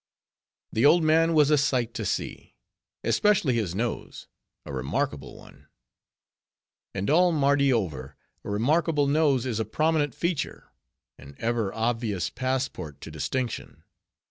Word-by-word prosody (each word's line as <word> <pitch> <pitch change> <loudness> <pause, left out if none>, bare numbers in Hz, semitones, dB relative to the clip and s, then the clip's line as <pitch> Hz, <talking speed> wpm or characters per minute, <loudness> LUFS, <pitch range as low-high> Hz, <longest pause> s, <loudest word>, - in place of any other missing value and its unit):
The 110 - +1
old 160 +4 +6
man 165 +1 +3
was 150 -1 +5
a 150 - +5
sight 125 -5 0
to 110 -1 -4
see; - - -4 0.5
especially 195 -10 +2
his 105 -7 -1
nose; 115 +3 -4 0.4
a - - -7
remarkable 65 +1 -3
one. - - -17 1.3
And 100 +1 -2
all 175 +4 +4
Mardi 140 -2 +3
over, 75 - -2 0.3
a - - -7
remarkable 145 +8 +2
nose 140 -3 +2
is 115 -4 -2
a - - +1
prominent 150 +5 0
feature: 170 -3 -3 0.5
an 70 +1 -13
ever 115 -3 -1
obvious 115 -5 -1
passport 130 - -3
to 80 - -8
distinction. 115 - -4
130 Hz, 130 wpm, -26 LUFS, 105-150 Hz, 1.3 s, old